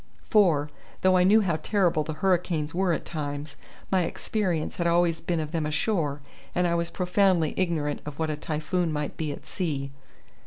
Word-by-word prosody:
For, 165 Hz, -9 st, +4 dB, 0.3 s
though 185 Hz, 0 st, +4 dB
I 180 Hz, -, +5 dB
knew 210 Hz, +4 st, +6 dB
how 175 Hz, -6 st, 0 dB
terrible 175 Hz, -5 st, +1 dB
the 155 Hz, -, -4 dB
hurricanes 170 Hz, -4 st, 0 dB
were 185 Hz, +1 st, +1 dB
at 165 Hz, -, -1 dB
times, 145 Hz, -2 st, -5 dB, 0.4 s
my 190 Hz, -1 st, +4 dB
experience 175 Hz, -2 st, -2 dB
had 170 Hz, -, +1 dB
always 170 Hz, -1 st, +2 dB
been 170 Hz, -2 st, -1 dB
of 155 Hz, -1 st, -4 dB
them 160 Hz, -3 st, -1 dB
ashore, 150 Hz, -2 st, 0 dB, 0.3 s
and 180 Hz, -, +2 dB
I 170 Hz, -, +2 dB
was 170 Hz, 0 st, 0 dB
profoundly 180 Hz, -3 st, +2 dB
ignorant 155 Hz, -5 st, -1 dB
of 150 Hz, -1 st, -7 dB
what 160 Hz, -1 st, -1 dB
a -, -, -1 dB
typhoon 155 Hz, +3 st, -1 dB
might 150 Hz, -1 st, -3 dB
be 155 Hz, -2 st, -2 dB
at -, -, -8 dB
sea. 140 Hz, -7 st, -3 dB
165 Hz, 185 wpm, -27 LUFS, 150-180 Hz, 0.4 s, knew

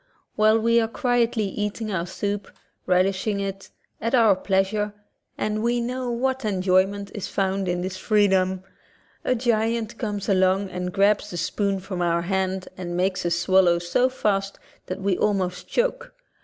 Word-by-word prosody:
While 215 Hz, +1 st, +4 dB
we 230 Hz, +1 st, +3 dB
are 225 Hz, -, 0 dB
quietly 240 Hz, -1 st, +1 dB
eating 210 Hz, +2 st, -3 dB
our 175 Hz, -2 st, -2 dB
soup, 200 Hz, +2 st, -3 dB, 0.4 s
relishing 190 Hz, +3 st, +1 dB
it, 195 Hz, -1 st, -5 dB, 0.3 s
at 230 Hz, +4 st, +1 dB
our 225 Hz, -5 st, +5 dB
pleasure 205 Hz, +2 st, 0 dB, 0.4 s
(and 215 Hz, 0 st, -1 dB
we 240 Hz, +1 st, +1 dB
know 250 Hz, +1 st, -3 dB
what 260 Hz, +2 st, -1 dB
an 210 Hz, -2 st, 0 dB
enjoy 185 Hz, 0 st, +3 dB
ment 200 Hz, 0 st, -7 dB
is 205 Hz, -, -4 dB
found 195 Hz, -1 st, -1 dB
in 175 Hz, 0 st, -1 dB
this 185 Hz, +1 st, -4 dB
freedom), 190 Hz, -3 st, +2 dB, 0.6 s
a 255 Hz, -, +1 dB
giant 230 Hz, -1 st, 0 dB
comes 205 Hz, -3 st, -3 dB
along 190 Hz, 0 st, +2 dB
and 180 Hz, 0 st, -3 dB
grabs 205 Hz, +2 st, +2 dB
the 175 Hz, -, -6 dB
spoon 195 Hz, +3 st, -1 dB
from 185 Hz, -1 st, -5 dB
our 170 Hz, -1 st, +1 dB
hand 190 Hz, 0 st, -1 dB
and 175 Hz, -1 st, -5 dB
makes 185 Hz, -1 st, 0 dB
us 170 Hz, -, +1 dB
swallow 180 Hz, -1 st, +4 dB
so 175 Hz, +9 st, +1 dB
fast 200 Hz, -6 st, -1 dB, 0.3 s
that 185 Hz, +1 st, -5 dB
we 190 Hz, -2 st, 0 dB
almost 190 Hz, -3 st, 0 dB
choke. -, -, -1 dB
200 Hz, 165 wpm, -24 LUFS, 185-220 Hz, 0.6 s, our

